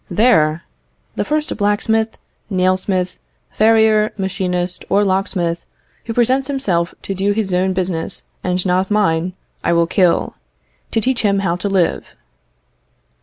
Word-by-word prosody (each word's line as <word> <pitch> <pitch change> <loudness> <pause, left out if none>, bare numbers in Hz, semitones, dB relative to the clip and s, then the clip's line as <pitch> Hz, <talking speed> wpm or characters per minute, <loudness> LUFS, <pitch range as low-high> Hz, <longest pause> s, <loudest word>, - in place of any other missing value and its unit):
There, 170 -6 +3 0.5
the - - 0
first 305 0 -1
blacksmith, 220 +2 0 0.3
nail 185 -2 +2
smith, 185 -1 -2 0.3
farrier, 220 -1 +4
machinist, 180 -2 -2
or 200 +1 +3
locksmith, 185 -3 -1 0.4
who 230 - -3
presents 260 +3 +2
himself 190 -12 -1
to 195 - -3
do 195 +2 0
his 205 -3 -2
own 185 +1 +1
business 180 -3 -2 0.2
and 180 0 -1
not 185 +1 +1
mine, 185 -4 +1 0.3
I - - +2
will 170 0 +3
kill, 180 0 +2 0.6
to 225 - 0
teach 255 +1 0
him 200 -2 +2
how 170 -1 +1
to 200 +3 -3
live." 190 -3 0
190 Hz, 135 wpm, -18 LUFS, 180-215 Hz, 0.6 s, farrier